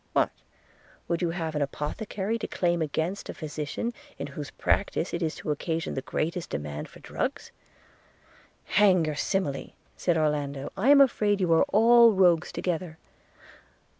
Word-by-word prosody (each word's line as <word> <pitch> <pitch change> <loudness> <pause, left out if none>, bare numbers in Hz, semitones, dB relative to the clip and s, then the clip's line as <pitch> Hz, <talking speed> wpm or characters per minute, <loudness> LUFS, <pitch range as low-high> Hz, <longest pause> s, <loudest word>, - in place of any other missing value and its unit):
What? - - +2 0.8
would 170 0 -1
you 175 - +1
have 165 -2 -3
an 150 - -1
apothecary 195 +9 -3
declaim 175 -4 0
against 160 +5 -2
a - - -5
physician 155 +9 -4 0.2
in - - -4
whose 145 -1 -6
practice 190 -3 -1
it 170 - -2
is 160 -1 -1
to 155 - -4
occasion 160 +2 -2
the 135 - -3
greatest 165 +5 -3
demand 75 0 -5
for - - -15
drugs?' - - -4 1.1
'Hang 190 -5 +4
your 155 - -1
simile!' 145 -2 -2 0.2
said 175 -2 +1
Orlando: 145 -3 -1
'I 215 +8 +1
am 285 -1 +8
afraid 210 -6 +3
you 175 -3 +2
are 165 - +5
all 230 +2 +6
rogues 180 -3 +3
together.' 170 -2 -3
170 Hz, 150 wpm, -27 LUFS, 150-195 Hz, 1.1 s, am